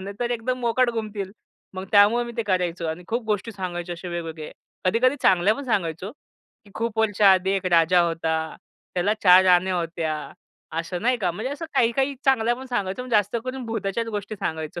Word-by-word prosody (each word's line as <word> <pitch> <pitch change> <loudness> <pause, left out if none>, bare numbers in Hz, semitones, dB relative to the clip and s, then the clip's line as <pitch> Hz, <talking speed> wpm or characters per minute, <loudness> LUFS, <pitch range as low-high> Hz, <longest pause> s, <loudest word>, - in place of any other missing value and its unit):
नाही 195 +1 -7
तर 240 - -1
एकदम 245 +2 -2
मोकाट 240 +1 +2
गुमतील. 210 -4 -5 0.4
मग 185 0 -5
त्यामुळं 210 +4 +5
मी 240 - -7
ते 230 - 0
करायचो 180 -4 -1
आणि 160 +3 -5
खूप 235 +4 -1
गोष्टी 215 +1 -2
सांगायचे 175 -3 -5
असे 175 +1 -7
वेगवेगळे, 165 -3 -6 0.3
कधी-कधी 245 +8 +3
चांगल्या 190 +3 +4
पण 280 - -7
सांगायचो. 185 -5 -2 0.5
की 205 - -18
खूप 230 -1 -3
वर्षाआधी 195 -3 +4
एक 195 -1 -1
राजा 170 +2 +5
होता. 165 -1 -1 0.6
त्याला 190 +4 +1
4 185 -1 +8
राण्या 185 0 +4
होत्या. 165 -2 -2 0.6
असं 175 +2 -4
नाही 250 +2 +2
का, 185 -5 0
म्हणजे 220 +10 -4
असं 300 +3 -6
काही-काही 265 +3 +2
चांगल्या 240 -4 +3
पण 260 +2 -9
सांगायचो. 205 -3 -2
पण 255 - -9
जास्त 205 -1 +2
करून 255 0 -5
भूताच्याच 225 0 -2
गोष्टी 210 0 -5
सांगायचो. 160 -4 -4
200 Hz, 180 wpm, -24 LUFS, 180-230 Hz, 0.6 s, 4